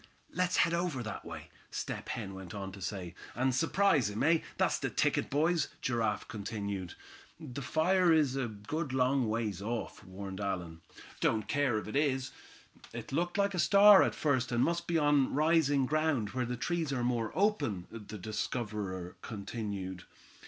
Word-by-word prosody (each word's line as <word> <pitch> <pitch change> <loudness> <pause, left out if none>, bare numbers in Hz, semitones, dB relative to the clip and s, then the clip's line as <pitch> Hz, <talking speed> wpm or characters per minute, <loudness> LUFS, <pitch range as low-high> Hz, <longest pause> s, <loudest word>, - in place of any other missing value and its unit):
"Let's 180 0 +1
head 170 - +4
over 170 -7 -1
that 110 -3 -6
way," - - -9 0.2
Step - - -5
Hen 95 - -4
went 95 0 -8
on 95 -1 -5
to 100 0 -11
say. 90 -3 -4 0.2
"And 130 +1 +1
surprise 165 - +3
him, 105 +1 -2
eh? 165 +2 +5 0.2
That's - - +2
the - - -1
ticket, - - +1
boys," 155 +2 +2
Giraffe 115 -4 -1
continued. 100 -4 -4 0.4
"That 140 -4 -7
fire 170 +6 +3
is 150 -5 +3
a 135 -3 -1
good 130 +8 -4
long 130 -2 +2
ways 110 -3 -2
off," 115 +3 -4
warned 95 0 -7
Allan. 90 -4 -3 0.4
"Don't 110 -1 +1
care 145 -6 +1
if 105 - -4
it 105 - -6
is." 135 -2 +1 0.6
"It - - -7
looked 175 +7 -1
like 200 0 +2
a 180 - -2
star 200 +2 +8
at - - +1
first, 130 -4 +1
and 120 +1 +2
must 170 0 0
be 170 - +2
on 145 -4 +3
rising 150 -3 +3
ground, 150 -7 +1
where 125 +1 -1
the 125 0 -3
trees 165 +3 -1
are 125 -3 -1
more 120 -3 0
open," 180 - +1
the 105 -1 -8
discoverer 105 -3 -4
continued. 100 -4 -5
125 Hz, 170 wpm, -32 LUFS, 105-155 Hz, 0.6 s, star